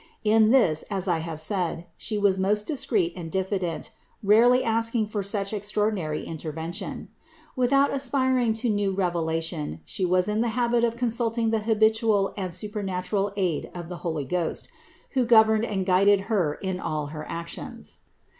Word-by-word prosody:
In 220 0 +4
this 220 -12 +4
as 195 -2 -3
I 170 -3 +1
have 160 -1 -5
said, 170 0 -1
She 215 - -3
was 200 -2 +2
most 205 +2 +1
discreet 235 - 0
and 170 -3 -6
diffident, 190 +1 -2 0.3
rarely 235 +5 +5
asking 230 0 +1
for 210 0 -3
such 200 +1 -2
extraordinary 205 -6 -1
interven 160 +1 -5
tion. - - -5 0.5
Without 275 +2 +3
aspiring 260 -3 +1
to 225 +3 -2
new 205 -2 0
revelation 165 - -2
She 190 - -3
was 180 +1 +2
in 210 +1 0
the 240 - +1
habit 240 -1 +2
of 230 -1 +1
consulting 230 -1 0
the 225 - +1
habitual 220 -1 +2
and 185 -3 -4
supernatural 200 +1 -2
aid 180 -6 -1
of 175 -1 -7
the 180 - -6
Holy 160 -5 -3
Ghost, 170 +4 -2 0.4
who 260 -2 +2
governed 220 -1 +5
and 195 -4 -2
guided 195 +2 +4
Her 190 -8 0
in 190 -1 -4
all 155 -4 -2
her 155 -1 -7
actions. 195 +9 -6
200 Hz, 160 wpm, -25 LUFS, 175-225 Hz, 0.5 s, rarely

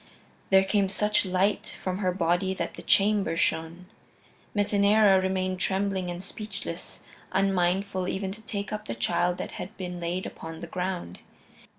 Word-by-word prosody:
There 190 0 +6
came 195 0 +2
such 210 0 +2
light 185 +3 +1
from 185 0 -2
her 185 -3 +1
body 180 +1 +1
that - - -3
the - - -9
chamber 200 -4 +3
shone. 165 +2 0 0.7
Metaneira 205 -1 +5
remained 185 0 -1
trembling 190 -1 0
and 175 +1 -5
speechless, 200 -4 -7 0.3
unmindful 190 0 +1
even 190 0 -2
to 215 +3 -9
take 205 -1 -4
up 210 0 -4
the 115 - -4
child 175 +8 +1
that - - -5
had 205 +4 -8
been 180 -2 -5
laid 175 +2 -2
upon 160 0 -7
the - - -4
ground. 180 - -4
190 Hz, 155 wpm, -27 LUFS, 180-200 Hz, 0.7 s, There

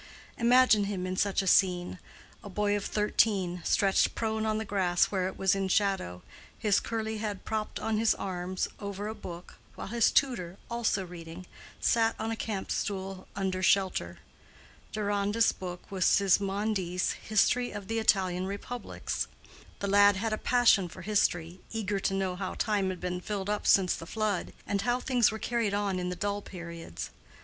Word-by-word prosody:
Imagine 240 -3 +5
him 195 -2 -3
in 185 0 -2
such 200 +1 +1
a - - -4
scene: 180 -1 +3 0.4
a 205 - -8
boy 205 +1 +1
of 205 - -3
thirteen, 200 -4 +1
stretched 195 -1 +2
prone 220 -1 -1
on 215 0 +1
the 220 - -3
grass 185 -4 +2
where 185 -2 0
it 190 - -6
was 190 -1 +3
in 195 -1 0
shadow, 190 - 0 0.3
his 210 -4 +2
curly 220 -1 -3
head 210 -3 -4
propped 215 -1 -3
on 220 -1 0
his 225 0 +3
arms 185 -1 -3
over 200 0 -5
a 215 - -3
book, 175 -4 -9 0.2
while - - -7
his 235 0 +3
tutor, 190 -10 +1
also 225 -5 0
reading, 170 0 -9 0.3
sat 225 -1 +2
on 225 +1 -3
a - - -1
camp 210 -3 -4
stool 190 -1 -3
under 190 -1 -1
shelter. 185 - +2 0.7
Deronda's 205 +1 +1
book 180 0 -8
was 190 -2 -1
Sismondi's 195 -2 +2
History 240 +3 +1
of 205 -2 -7
the 225 +1 -1
Italian 185 -4 +2
Republics; 200 +5 -4 0.5
the 200 - -1
lad 205 0 +6
had 220 +3 -1
a - - 0
passion 240 -6 +4
for 185 +2 -10
history, 175 -3 0
eager 210 -3 -1
to 195 - 0
know 190 -2 -1
how 190 - -4
time 205 -4 +1
had 185 -1 -4
been 180 0 -3
filled 200 0 -3
up 210 - -2
since 190 -2 +5
the 165 - -9
flood, 215 -3 -1
and 200 -1 -1
how 245 +3 +1
things 250 -3 +3
were 220 - -4
carried 225 -3 -1
on 200 -2 0
in 180 0 -2
the 180 - -3
dull 205 +3 -2
periods. 170 - -8
200 Hz, 175 wpm, -29 LUFS, 185-215 Hz, 0.7 s, lad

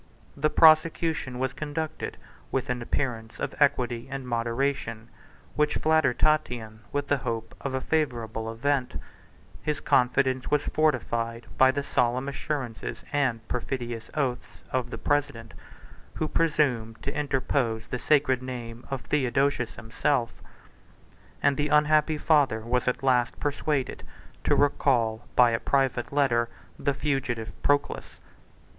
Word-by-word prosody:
The 150 +2 +1
prosecution 155 -3 +4
was 130 0 -1
conducted 155 +1 -4 0.3
with 130 -2 -1
an 125 -1 -2
appearance 115 -3 -3
of - - -3
equity 125 -5 +2
and 135 -2 -5
moderation, 115 -1 -1 0.5
which 150 0 +2
flattered 155 -5 +2
Tatian 120 -8 0
with 145 0 -2
the 145 - +2
hope 115 -3 -4
of 135 -1 -3
a 130 - -1
favorable 115 -8 -1
event: 130 +3 -1 0.6
his 150 -1 -1
confidence 130 +1 +2
was 150 -1 +2
fortified 115 -7 0
by 130 - +6
the 140 +2 0
solemn 125 0 +1
assurances, 140 -4 -4
and 125 -6 0
perfidious 120 -2 -4
oaths, 125 -10 -3
of 125 -2 -1
the - - -5
president, 145 -6 -1 0.6
who 155 - -1
presumed 135 -9 +1
to 140 - -2
interpose 130 -5 0
the 125 - -4
sacred 135 -4 +3
name 120 -2 -7
of 135 -2 -3
Theodosius 135 -2 0
himself; 120 +1 -1 1.0
and 140 - +3
the 145 0 +1
unhappy 150 +1 +4
father 145 -8 +3
was 125 +2 -1
at 125 +1 0
last 125 -3 +2
persuaded 145 -1 -1 0.4
to - - +4
recall, 120 -5 +2
by 120 -1 +6
a 115 - 0
private 135 -3 0
letter, 120 -5 +2 0.3
the 140 - 0
fugitive 130 -6 -2
Proculus. 145 0 0
130 Hz, 130 wpm, -27 LUFS, 120-145 Hz, 1.0 s, by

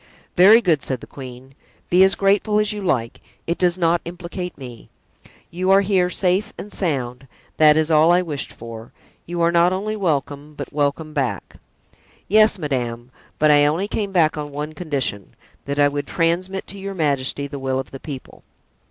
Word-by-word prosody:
"Very 210 +6 +7
good," 165 -7 +2
said 130 -2 -3
the - - -11
queen, 130 0 -11 0.4
"be 180 +2 +6
as 190 +1 +4
grateful 200 +2 +2
as 210 0 +1
you 210 - -5
like, 125 -12 -1 0.2
it 170 - -2
does 180 -1 +2
not 170 -1 +2
implicate 175 +1 -7
me; 125 -4 -11 0.6
you 185 +2 -2
are 195 +1 +6
here 190 -2 +1
safe 185 +2 0
and 205 - -8
sound, 135 -7 -2 0.3
that 155 -1 +6
is 160 +1 +1
all 155 +2 +5
I 180 +1 +3
wished 150 -5 -5
for; 115 0 -10 0.4
you 170 0 -3
are 170 0 +3
not 170 +1 +4
only 205 +3 -2
welcome, 150 -5 -2
but - - -7
welcome 150 +2 -1
back." 135 -4 -3 0.7
"Yes, 215 +1 +5
madame; 125 -6 -3 0.3
but 155 0 +4
I 145 0 +5
only 170 +7 0
came 205 -1 -3
back 165 -5 +2
on 145 0 -5
one 150 +2 -5
condition—that 140 - -5
I 145 0 +5
would 145 0 -4
transmit 180 +3 -1
to 200 - -7
your 195 0 -6
majesty 140 -3 -1
the 140 0 -7
will 130 0 -1
of 135 0 -5
the 135 - -8
people." 140 -3 -9
160 Hz, 180 wpm, -21 LUFS, 140-185 Hz, 0.7 s, Very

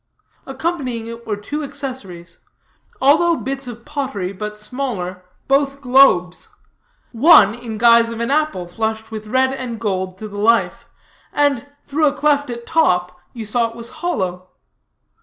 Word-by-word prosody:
Accompanying 270 -5 -3
it 230 0 -9
were 210 -2 -2
two 290 +9 -5
accessories, 255 - -7 0.6
also 325 +5 +4
bits 270 -2 -4
of 235 -1 -9
pottery, 260 -11 -3
but 210 +2 -6
smaller, 210 -6 -5 0.2
both 275 0 +1
globes; 250 -10 +3 0.6
one 230 - +6
in 230 -2 -7
guise 230 0 +5
of 230 0 -6
an 235 +3 -1
apple 300 -12 0
flushed 220 +4 -3
with 215 -1 -7
red 260 +3 +2
and 250 -4 -5
gold 190 -4 -2
to 215 - -7
the 205 -1 -8
life, 230 +2 +2 0.4
and, 285 -2 +1 0.2
through 300 +2 +1
a 280 - +1
cleft 285 -1 +1
at 235 -1 -6
top, 180 - +2 0.2
you 230 -3 -6
saw 230 +2 +1
it 230 - -14
was 235 0 -7
hollow. 185 - -2
235 Hz, 150 wpm, -19 LUFS, 210-275 Hz, 0.6 s, one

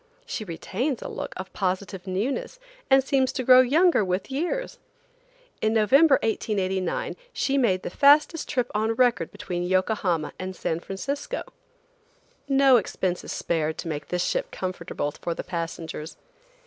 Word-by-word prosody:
She 220 - -4
retains 220 - -3
a - - -5
look - - -5
of 190 0 -7
positive 190 0 -3
newness 255 - -2 0.3
and 270 0 +6
seems 265 -1 +2
to 260 - -2
grow 255 +1 +8
younger 310 - +4
with 185 +6 -2
years. 355 - -2 0.8
In 220 0 +2
November, 270 +8 +5
1889, 190 -5 -1 0.2
she 275 - 0
made 200 -9 +2
the - - -4
fastest 295 - +4
trip 250 -1 -1
on 220 +2 0
record 240 -9 +2
between 175 -1 -4
Yokohama 185 -3 0
and 185 0 -5
San 160 -1 -2
Francisco. 280 - -4 1.1
No 270 -2 +6
expense 185 -4 -2
is - - -7
spared 160 -2 -1
to - - -5
make 150 -2 -4
this 180 0 -1
ship - - -1
comfortable 175 -5 -4
for 170 +3 -4
the - - -5
passengers. 165 -2 -5
210 Hz, 150 wpm, -25 LUFS, 180-270 Hz, 1.1 s, grow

